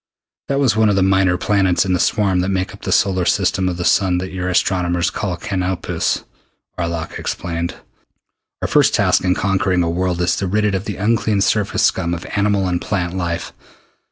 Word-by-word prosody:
"That 140 0 0
was 130 -7 +2
one 110 -1 +3
of 100 - +2
the 95 - +3
minor 95 -1 +3
planets 95 -2 +2
in 95 - 0
the 90 - +1
swarm 100 0 +1
that 90 +2 0
make 95 -1 -2
up - - -14
the - - -3
solar 95 -2 +2
system 95 +1 +1
of 90 - -4
the 90 - -3
sun 95 -2 +3
that 95 +1 -4
your 90 -1 -3
astronomers 90 -1 +1
call 95 -4 -3
Canopus," 90 -1 -2 0.5
Arlok 85 -2 -4
explained. 85 0 -3 0.9
"Our - - +1
first - - +3
task - - +2
in 90 0 +2
conquering 95 -2 +1
a 85 - -1
world 90 0 -1
is 90 -1 +2
to 95 - -2
rid 105 +3 +1
it 105 - +1
of 95 +1 -2
the 105 - -4
unclean 105 0 +1
surface 105 0 +1
scum 85 -2 +1
of 85 - -8
animal 100 -2 +1
and 90 -1 -1
plant 90 -3 -2
life. 85 -2 -3
95 Hz, 200 wpm, -19 LUFS, 90-100 Hz, 0.9 s, one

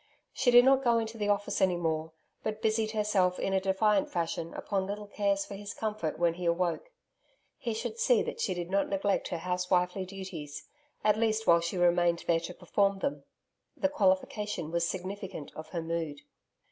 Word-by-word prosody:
She 250 - +2
did 245 0 +8
not 270 0 +5
go 235 -2 +4
into 225 0 -3
the 205 0 0
Office 205 0 0
any 185 -2 +4
more, 160 -1 -1 0.3
but 215 0 -3
busied 220 0 +1
herself 210 -4 +1
in 195 - -1
a 190 - +2
defiant 195 +1 +2
fashion 165 -1 -2
upon 195 -2 -2
little 205 +1 -4
cares 200 -1 0
for - - -9
his 205 +1 -7
comfort 210 -8 -2
when 170 -1 +2
he 175 +1 -6
awoke. 170 - 0 0.7
He 230 -2 -2
should 225 0 -4
see 245 -2 +4
that - - -5
she 185 - 0
did 175 0 -5
not 195 0 +1
neglect 195 0 0
her 175 - -3
house 180 +1 -2
wifely 180 +1 +1
duties 185 -7 -7 0.4
at 215 0 +3
least 220 -1 +1
while 170 0 +6
she 170 +2 -3
remained 175 -1 +3
there 165 -1 +3
to 170 +2 -6
perform 195 +2 +1
them. 280 +8 -3 0.5
The 285 - +2
qualification 205 - 0
was 170 0 +1
significant 190 -4 -5
of 155 0 -8
her 165 0 -3
mood. 165 -3 -3
190 Hz, 190 wpm, -30 LUFS, 175-210 Hz, 0.7 s, did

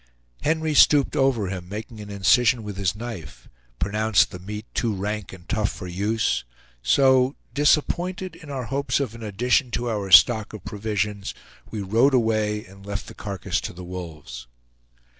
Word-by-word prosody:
Henry 160 0 0
stooped 145 -1 +5
over 135 -6 +2
him, 95 -1 -3
and - - -16
making 110 +2 -7
an 105 - -9
incision 110 +4 +3
with 105 -1 -6
his 95 -1 0
knife, 105 -10 -8 0.3
pronounced 105 +5 +2
the 90 - -8
meat 105 +4 -7
too 115 -4 0
rank 105 +1 -4
and 90 -2 -13
tough 105 -1 0
for 95 - -8
use; 100 - 0 0.4
so, 130 - +4 0.2
disappointed 175 +6 +1
in 150 - -13
our 135 -2 -3
hopes 140 +4 0
of 130 -6 -2
an 115 - -10
addition 120 +6 +1
to 120 0 -2
our 100 -3 -3
stock 110 +3 +6
of 105 -4 -9
provisions, 105 -1 -3 0.3
we 110 - -4
rode 115 +8 +3
away 110 -3 +1
and 95 +1 -15
left 100 0 -5
the - - -10
carcass 100 -4 -3
to - - -6
the 90 +1 -9
wolves. 80 -9 -8
105 Hz, 170 wpm, -24 LUFS, 100-125 Hz, 0.4 s, stock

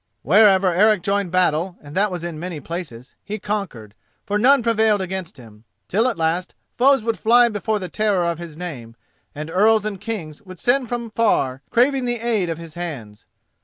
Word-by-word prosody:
Wherever 190 - +5
Eric 210 +1 +3
joined 200 -2 -1
battle, 180 0 +1
and 145 -1 -13
that 205 +2 +2
was 180 -3 -5
in 170 -3 -5
many 175 -2 -5
places, 145 -7 -7
he 210 +1 -5
conquered, 195 - -5 0.3
for 205 +1 -1
none 270 +3 +5
prevailed 220 -2 +2
against 190 -4 -5
him, 110 -3 -15 0.2
till 220 +6 +1
at 235 - -4
last 165 +2 -1 0.2
foes 270 -1 +4
would 230 -1 -2
fly 240 +2 +5
before 215 0 -2
the 185 -3 -5
terror 205 -3 0
of 170 -1 -2
his 165 -3 -9
name, 130 -10 -7 0.4
and 155 +2 -6
earls 215 +3 +3
and 200 -3 -4
kings 190 -9 -6
would 185 -3 -12
send 245 +4 +1
from 235 -2 -4
far 135 - +1
craving 260 +2 +2
the 240 -1 -2
aid 220 -6 0
of 165 - -3
his 165 -2 -10
hands. 140 -12 -7
190 Hz, 190 wpm, -21 LUFS, 165-220 Hz, 0.4 s, Wherever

